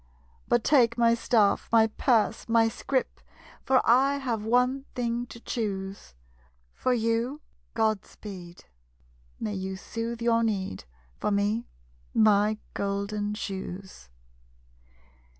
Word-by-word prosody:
But 240 - +2
take 240 -5 +4
my 230 -1 +4
staff, 225 -3 +2
my 225 -1 +6
purse, 225 0 +1
my 225 0 +4
scrip; 260 +3 -2 0.4
For 260 -1 +2
I 270 +4 +4
have 245 -6 -2
one 250 +4 +2
thing 240 0 -1
to 235 - -11
choose. 195 - -4 0.6
For 255 - -1
you, 230 +4 0 0.4
Godspeed! 200 -5 -3 0.7
May 215 -2 -3
you 190 0 -4
soothe 230 +4 -5
your 230 -1 +3
need. 190 - -2 0.3
For - - 0
me, 205 +3 0 0.5
my 210 0 +4 0.2
golden 200 +1 -2
shoes! 190 - -7
225 Hz, 110 wpm, -27 LUFS, 200-235 Hz, 0.7 s, my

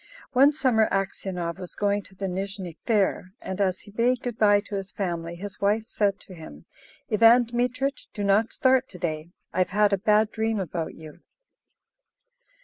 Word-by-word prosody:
One 275 +3 +6
summer 250 -7 +2
Aksionov 190 -3 -3
was 180 - -8
going 205 0 +1
to 190 - -17
the 195 - -4
Nizhny 190 -2 -4
Fair, 195 -4 +1
and 190 +1 -4
as 190 -1 0
he 205 - -15
bade 240 +3 +1
good 240 -3 -4
bye 205 -1 +5
to 210 - -12
his 195 -1 -4
family, 170 -3 -3
his 200 +3 -8
wife 210 +2 +2
said 205 -3 0
to 190 - -13
him, 155 - -12 0.5
"Ivan 230 +3 +6
Dmitrich, 250 +3 -2
do 205 - -5
not 200 +3 +2
start 260 0 +2
to 180 - -11
day; 160 -2 -3 0.2
I - - -2
have 185 - +2
had 205 +1 +3
a 195 - +1
bad 210 +1 +3
dream 220 -1 -1
about 170 -3 -4
you." 155 -1 -12
200 Hz, 180 wpm, -25 LUFS, 185-225 Hz, 0.5 s, One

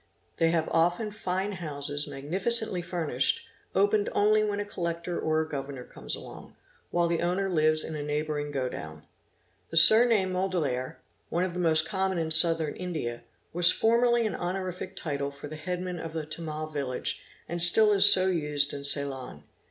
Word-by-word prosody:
They 165 - +2
have 165 -1 -1
often 175 +6 0
fine 190 -1 -4
houses 145 -5 -3
magnificently 180 +8 +1
furnished, 160 -7 -2 0.3
opened 205 +2 +1
only 215 +1 +2
when 205 -1 -2
a 205 - -3
Collector 170 -2 -5
or 155 0 0
a 160 - -5
Governor 140 -3 -7
comes - - -6
along, - - -12 0.3
while 175 0 0
the 170 -1 -2
owner 180 +3 -1
lives 155 -3 +1
in 160 - -7
a 150 - -5
neighbouring 150 0 -3
go 135 -3 -3
down. 80 -9 -9 0.7
The 165 - -3
surname 220 +2 +7
Mudaliar, 165 -9 -3 0.3
one 175 - -1
of 185 -2 -3
the 180 - -5
most 160 -2 +2
common 190 -2 -2
in 160 -1 -3
Southern 160 -1 +2
India, 155 -10 -5 0.3
was 175 0 +6
formerly 235 +1 +1
an 215 - -2
honorific 185 +1 -5
title 140 -5 -4
for 140 +1 -11
the 155 - -9
headman 180 +3 -5
of 165 0 -8
a 160 -2 -4
Tamil 155 0 -6
village 140 -5 -4 0.2
and 170 +1 -4
stall 210 +5 +7
is 195 - +8
so 185 - +5
used 150 -5 +1
in 140 - -7
Ceylon. 135 - 0
165 Hz, 170 wpm, -27 LUFS, 145-185 Hz, 0.7 s, is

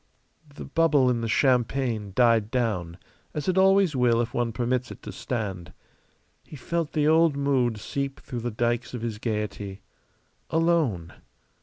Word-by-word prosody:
The - - -8
bubble 145 -4 +3
in 120 -1 -1
the 115 - -2
champagne 120 -4 +1
died 115 -4 +4
down 105 -9 -1 0.4
as 150 -2 -3
it 185 - +2
always 190 -3 +4
will 120 -2 +3
if 120 0 -2
one 120 -1 0
permits 125 +2 -1
it - - -11
to - - -6
stand. 95 -8 -5 0.7
He - - -12
felt 165 +3 -3
the 150 -2 +2
old 160 -2 +4
mood 130 -5 +1
seep 140 +5 -4
through 125 -3 -6
the 120 +1 -3
dikes 120 +2 -1
of 120 - -6
his 110 -3 -4
gayety. 105 -3 -4 0.7
Alone. 160 - +1
120 Hz, 155 wpm, -26 LUFS, 110-140 Hz, 0.7 s, died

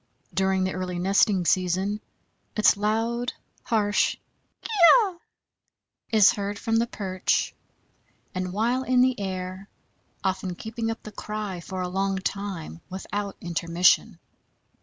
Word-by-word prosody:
During 190 +1 +2
the 185 - -1
early 180 -1 -3
nesting 190 0 +3
season 185 +4 +1 0.5
its 215 - +5
loud, 225 +4 0 0.3
harsh 210 -3 +1 0.5
kee - - -6 0.3
oe 390 -8 +1 0.9
is 215 -4 +6
heard 205 0 -3
from 225 +2 0
the 230 +1 +2
perch 185 -5 -1 0.8
and 185 -1 -3
while 235 +6 +1
in 255 -1 +3
the 255 -3 +3
air, 185 0 -5 0.5
often 190 -1 -1
keeping 225 +3 -4
up 225 - -5
the 215 - -8
cry 210 -3 -5
for 185 +2 -5
a - - -2
long 195 +1 -1
time 190 -4 -4
without 200 +1 -4
intermission. 170 +3 +2
200 Hz, 125 wpm, -26 LUFS, 185-220 Hz, 0.9 s, is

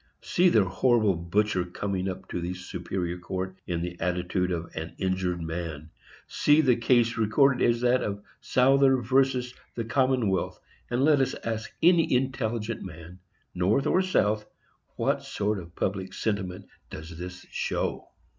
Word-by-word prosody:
See 180 +1 +3
the 110 - +4
horrible 105 +2 +2
butcher 90 +3 0
coming 95 +1 -3
up 95 - -7
to 90 - -3
the 90 +2 -3
Superior 90 0 -4
Court 95 +1 -4
in 85 -1 -2
the 85 0 -6
attitude 90 +1 0
of 85 -1 -3
an 80 +1 -6
injured 95 -2 -1
man! 80 -2 -5 0.4
See 150 +1 +3
the 130 -5 +4
case 115 0 +2
recorded 130 +4 +3
as 120 0 +2
that 125 +1 +3
of 100 0 -3 0.2
Souther 135 +1 +4
VERSUS 130 0 +1 0.2
The 115 - -3
Commonwealth, 125 -7 +1 0.3
and 125 +2 +1
let 150 -3 +5
us 135 - 0
ask 110 -1 -3
any 170 -1 +5
intelligent 120 -4 -1
man, 85 0 -10 0.3
North 95 +9 +1
or 185 - +3
South, 105 - +1 0.5
what - - 0
sort 105 0 -2
of 85 -1 -12
public 95 -1 -2
sentiment 95 -3 -2 0.2
does 80 +2 -8
this 90 +1 -8
show! - - -2
100 Hz, 150 wpm, -27 LUFS, 90-125 Hz, 0.5 s, let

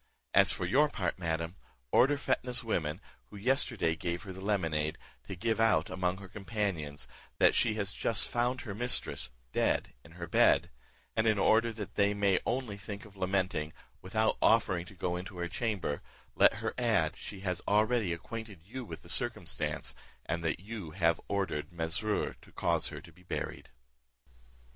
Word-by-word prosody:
As - - +7
for - - -1
your 150 +3 +4
part, 95 -8 -2
madam, 85 +1 -2 0.3
order 145 +3 +5
Fetnah's 125 -2 +2
woman, 85 -5 -1 0.3
who 105 - -10
yesterday 115 - +1
gave 85 +1 -3
her 95 -3 -7
the 95 - -9
lemonade, 80 -7 0 0.3
to 95 - -5
give 110 +5 0
out, 105 -8 +3
among 90 0 0
her 100 0 -9
companions, 95 -9 -3 0.3
that - - +6
she 110 -2 +3
has 100 -2 -1
just 115 -1 +1
found 125 +2 0
her 110 -6 -5
mistress 120 - 0 0.2
dead - - +1
in 80 - -15
her 85 0 -6
bed; - - +4 0.4
and 110 0 +2
in 110 -1 +4
order 115 +4 +4
that 105 -2 -6
they 100 0 +3
may 100 -2 +3
only 120 -4 -1
think 100 0 -7
of 105 -2 -15
lamenting, 95 -5 0 0.3
without 110 +4 +1
offering 95 -6 +4
to 100 - -12
go 90 0 -1
into 90 +1 -6
her 85 0 -2
chamber, 95 -8 -2 0.3
let - - +5
her - - -3
add, - - +2
she 95 - -8
has 90 -2 -2
already 110 -1 +3
acquainted 105 +1 -6
you 125 +8 -6
with 115 - -8
the - - -14
circumstance, - - -1 0.3
and 85 0 -2
that 80 0 0
you 100 -3 -6
have 85 0 +2
ordered 90 -7 -1
Mesrour 85 +5 0
to - - -17
cause - - +1
her - - -6
to - - -14
be 90 - -20
buried." 90 - -5
100 Hz, 170 wpm, -32 LUFS, 85-110 Hz, 0.4 s, As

